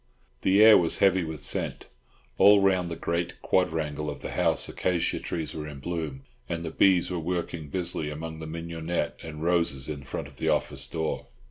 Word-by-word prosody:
The 100 +3 +5
air 110 -1 +9
was 85 -2 +2
heavy 95 -2 +4
with 80 -2 -6
scent. - - 0 0.5
All 100 0 +8
round 95 -3 +2
the 85 - -4
great 85 +1 -3
quadrangle 75 -4 0
of 75 - -7
the - - -5
house - - +2
acacia 90 -2 0
trees 80 -3 -4
were 75 -1 -5
in 75 -2 -8
bloom, 75 -4 -4 0.3
and 85 0 -3
the 80 - -4
bees 90 0 +3
were 90 - -2
working 85 -2 -3
busily 85 -2 -2
among 80 +1 -6
the 80 - -7
mignonette 80 -1 -3
and 80 -1 -7
roses 85 -6 +1
in 75 -2 -5
front 65 - -6
of - - -17
the - - -1
office 70 -1 0
door. 80 +2 -3
80 Hz, 190 wpm, -27 LUFS, 75-90 Hz, 0.5 s, air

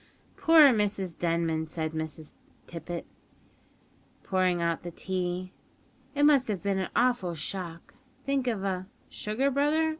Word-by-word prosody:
"Poor 320 -3 +7
Mrs 200 -5 -1
Denman," 165 -2 0
said 160 0 -3
Miss 160 -1 -5 0.3
Tippet, 170 +1 -6 1.2
pouring 185 -2 +1
out 170 -1 0
the 175 - -6
tea; 185 +1 -3 0.6
"it 290 - +2
must 285 -3 +5
have 205 -4 -3
been 200 -1 0
an 190 - -2
awful 240 -8 +2
shock; 170 0 -6 0.3
think 275 -2 0
of 220 -5 -1
a 185 -1 -2 0.2
(Sugar, 250 +7 -1
brother? 300 +4 +2
185 Hz, 130 wpm, -28 LUFS, 170-245 Hz, 1.2 s, Poor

